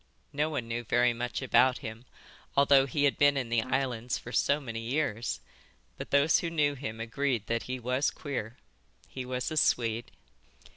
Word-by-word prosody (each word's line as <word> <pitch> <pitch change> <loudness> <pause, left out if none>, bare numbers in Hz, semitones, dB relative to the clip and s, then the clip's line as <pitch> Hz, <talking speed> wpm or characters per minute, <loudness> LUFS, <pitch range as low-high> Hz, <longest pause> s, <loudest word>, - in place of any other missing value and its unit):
No 150 +2 0
one 140 -7 -3
knew 115 +1 -3
very 120 +1 +3
much 120 +3 -4
about 130 0 +4
him, 110 +3 -7 0.5
although 140 -1 +5
he 145 +2 -1
had 145 - +2
been 145 -1 +5
in 125 -4 -2
the 115 -1 +2
islands 125 -1 -1
for 125 - -9
so 140 +3 +2
many 115 -5 -6
years, 115 - -2 0.5
but - - -7
those 140 +3 +4
who 170 - -2
knew 150 -3 +1
him 115 -5 -6
agreed 120 0 -1
that 115 0 -1
he 130 0 -3
was 125 +4 +1
queer. 125 -5 -5 0.5
He 130 -1 -6
was 125 +4 -2
a 155 - -3
Swede. 115 -4 +1
125 Hz, 180 wpm, -29 LUFS, 115-140 Hz, 0.5 s, although